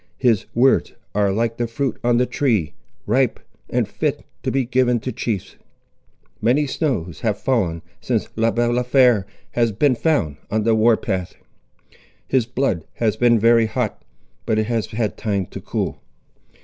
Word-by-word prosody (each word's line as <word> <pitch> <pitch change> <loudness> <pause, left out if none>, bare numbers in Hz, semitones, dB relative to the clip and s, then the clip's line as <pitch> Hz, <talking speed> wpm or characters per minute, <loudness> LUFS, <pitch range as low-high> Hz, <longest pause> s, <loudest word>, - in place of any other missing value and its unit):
His 115 -6 +2
words 130 +3 +3 0.2
are 100 -1 +2
like 115 +3 -1
the 120 - -1
fruit 130 +3 -2
on 120 0 +3
the 125 - +3
tree, 115 - 0 0.3
ripe 125 +3 +1 0.3
and - - 0
fit - - -2 0.2
to - - -2
be 135 -1 0
given 125 -1 +2
to 130 - -3
chiefs. 110 -7 -4 0.8
"Many 125 +7 +3
snows 125 - -2
have 105 -3 0
fallen 90 -11 0 0.2
since - - -1
Le 115 0 +2
Balafré 120 -2 +3 0.3
has 115 -2 +1
been 130 +6 +2
found 120 - 0
on 110 0 0
the 115 +1 +3
war 110 +1 +4
path. 95 -3 -3 0.9
His 130 -4 +1
blood 120 - -1
has 110 -3 +1
been 120 +1 +4
very 115 +1 +4
hot, 110 -1 -2 0.5
but 110 - +2
it 110 - +1
has 115 -3 -1
had 110 -3 -2
time 100 -4 -1
to - - -9
cool. - - -3
115 Hz, 160 wpm, -21 LUFS, 105-125 Hz, 0.9 s, war